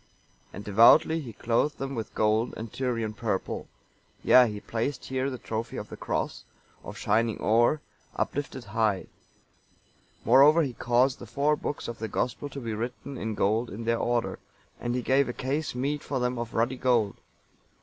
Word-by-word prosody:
And 100 - -8
devoutly 120 +11 +6
he 125 -6 -7
clothed 120 +8 0
them 135 0 -4
with 115 -4 -5
gold 110 +2 +1
and 115 -1 -7
Tyrian 115 -4 -2
purple; 105 -4 -3 0.6
yea, - - +2
and 115 - -2
he 105 - -6
placed 120 +6 -3
here 130 +1 -1
the 130 - -5
trophy 115 0 -4
of - - -6
the - - -7
Cross, - - -3 0.4
of - - -8
shining 110 +1 +1
ore, 120 +7 +3 0.3
uplifted 135 -3 -3
high; 105 -2 0 1.2
moreover 140 +8 +7
he 135 -4 -3
caused 125 +3 +2
the 120 - -9
four 145 +6 +1
books 145 - -4
of 120 - -6
the 110 - -3
Gospel 125 +6 -2
to 140 - -7
be 115 -4 -4
written 125 +5 -5
in 110 -3 -3
gold 110 +4 +1
in 110 +4 -7
their 115 0 +1
order, 120 -1 -1 0.4
and 120 0 -2
he 125 - -1
gave 135 +1 +3
a - - -3
case 140 +3 -2
meet 145 +4 -1
for 135 - -3
them 125 0 -1
of 120 -1 -5
ruddy 120 +3 +1
gold. 120 -6 +1
120 Hz, 180 wpm, -27 LUFS, 110-135 Hz, 1.2 s, moreover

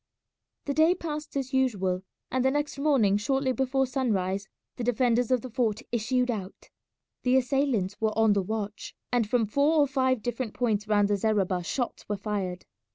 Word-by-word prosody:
The 280 - -1
day 320 +5 +4
passed 305 -4 -5
as 270 0 -3
usual, 195 -9 +1 0.3
and 255 0 +1
the 265 - +4
next 290 0 -2
morning 260 -9 +3
shortly 265 +5 0
before 265 +1 +1
sunrise 200 -7 -1 0.3
the 245 - -3
defenders 245 0 +2
of 255 -2 +2
the 255 - -7
fort 230 0 0
issued 245 +2 +1
out. 195 -4 -7 0.5
The 255 +1 +3
assailants 250 -7 0
were 220 -1 0
on 220 -2 +5
the 200 - +2
watch, 210 +1 -5 0.2
and 235 -4 +1
from 235 -1 +2
four 280 +9 +2
or 295 - +6
five 260 -4 +1
different 240 -2 -3
points 220 -4 0
round 205 -1 +3
the 205 - +2
zareba 195 -4 +1
shots 245 +5 -3
were 205 - -1
fired. 195 -3 -3
240 Hz, 175 wpm, -27 LUFS, 205-265 Hz, 0.5 s, or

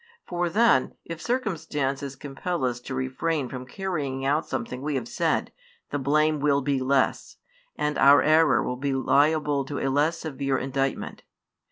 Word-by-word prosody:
For 175 -1 -1
then, 205 - +3
if 165 -1 -7
circumstances 150 - -2
compel 145 +3 -3
us 120 -1 -1
to 130 +2 -6
refrain 130 +2 -2
from 125 -1 -7
carrying 140 -6 -3
out 150 +4 +1
something 125 +2 -4
we 145 0 -2
have 125 -3 -2
said, - - 0 0.4
the 145 - -1
blame 150 +3 +2
will 140 -1 +2
be 140 0 0
less, 130 +1 0 0.4
and 150 0 -1
our 140 +1 +7
error 155 +1 +4
will 125 - -3
be 140 +1 -1
liable 145 +1 +2
to 145 +1 -5
a 135 - -1
less 155 +4 +2
severe 135 -4 -2
indictment. 135 +1 -2
140 Hz, 160 wpm, -26 LUFS, 135-155 Hz, 0.4 s, our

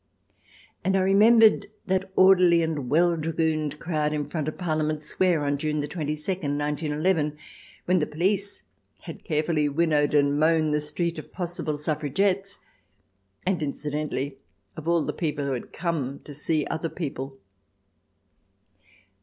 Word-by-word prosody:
And 190 0 +2
I - - +2
re 190 +1 +2
membered 220 +1 +6 0.2
that 190 -1 -1
orderly 180 -3 +6
and 150 -6 -2
well 170 +4 +3
dragooned 155 -2 -1
crowd 155 -2 -1
in 150 -1 -2
front 155 -3 -3
of 155 - -4
Parliament 155 -3 -1
Square 175 +1 +1
on 145 0 0
June 150 0 -1
22, 150 0 -3 0.2
191 150 0 -2
1, 150 -1 -2 0.5
when 180 +1 +3
the 150 - 0
police 195 +5 -1 0.4
had - - -9
carefully 155 -2 0
winnowed 150 -1 +2
and 145 0 +3
mown 155 0 +3
the 150 0 +1
street 170 +3 -2
of - - -11
possible 170 -4 -3
suffragettes, 185 +7 -1 0.9
and 180 -3 0
incidentally 145 -2 -3 0.4
of 155 0 -8
all 170 -2 +2
the - - -2
people 150 -4 -2
who 140 - -1
had 125 - -6
come 155 -6 -2
to 145 - -9
see 150 +1 0
other 160 +1 -3
people. 135 -5 -5
155 Hz, 145 wpm, -26 LUFS, 150-175 Hz, 0.9 s, membered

